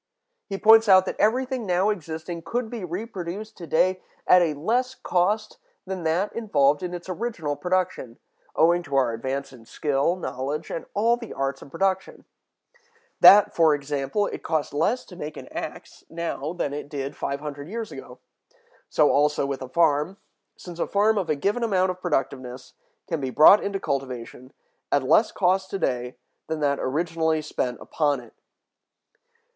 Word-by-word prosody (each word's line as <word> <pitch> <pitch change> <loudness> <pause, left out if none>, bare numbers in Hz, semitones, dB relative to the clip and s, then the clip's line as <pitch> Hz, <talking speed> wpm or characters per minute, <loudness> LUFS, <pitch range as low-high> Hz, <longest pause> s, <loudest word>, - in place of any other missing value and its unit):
He 195 - -4
points 220 +1 +6
out 185 -1 +7
that - - -5
everything 250 +2 +1
now 185 +3 +2
existing 165 -2 -6
could 235 +4 -3
be 235 -5 -5
reproduced 190 +2 -6
to 170 - -9
day 185 +4 +2 0.2
at 180 - +6
a 160 -3 +1
less 245 - 0
cost 210 +4 -1 0.3
than 190 -1 -5
that 170 +6 0
involved 145 -11 +2
in 180 -1 -4
its 175 +1 -9
original 185 -6 -3
production, 175 -7 -2 0.4
owing 170 +2 +4
to 145 -4 -5
our 130 -4 +2
advance 135 +4 -4
in 115 -3 -15
skill, 145 +3 0
knowledge, 145 -4 -4
and 165 - -5
all 230 +4 +3
the 230 -2 -8
arts 135 0 -3
of - - -12
production; 190 +4 -2 0.9
that, 205 0 +8
for 160 -3 +5
example, 145 +6 -2
it - - -5
costs 155 -3 -2
less 230 - 0
to 180 - -13
make 155 -3 -7
an - - -9
axe - - -8
now 165 -3 -4
than 150 -5 -3
it 145 0 -6
did 140 -1 -5
five 140 - -3
hundred 145 -1 -7
years 225 +1 -5
ago; - - -10 0.7
so 150 -2 +3
also 150 0 +2
with 140 -1 -4
a 130 - -7
farm, 160 +4 +2 0.4
since 175 -2 -10
a - - 0
farm 210 +1 +2
of 180 -4 -3
a 155 - +2
given 200 +11 -1
amount 190 -5 +2
of 185 0 -10
productiveness 135 -6 -3 0.3
can 165 -5 -2
be 135 - -2
brought 155 +10 +7
into 200 -1 -2
cultivation 130 -3 -5 0.4
at 145 - +2
less 215 - +4
cost 190 0 +1
to - - -3
day 125 -7 -2 0.3
than 160 -1 -3
that 140 -2 +1
originally 160 +2 0
spent 130 -5 -3
upon 145 -3 0
it. 120 -2 -15
165 Hz, 170 wpm, -25 LUFS, 140-195 Hz, 0.9 s, that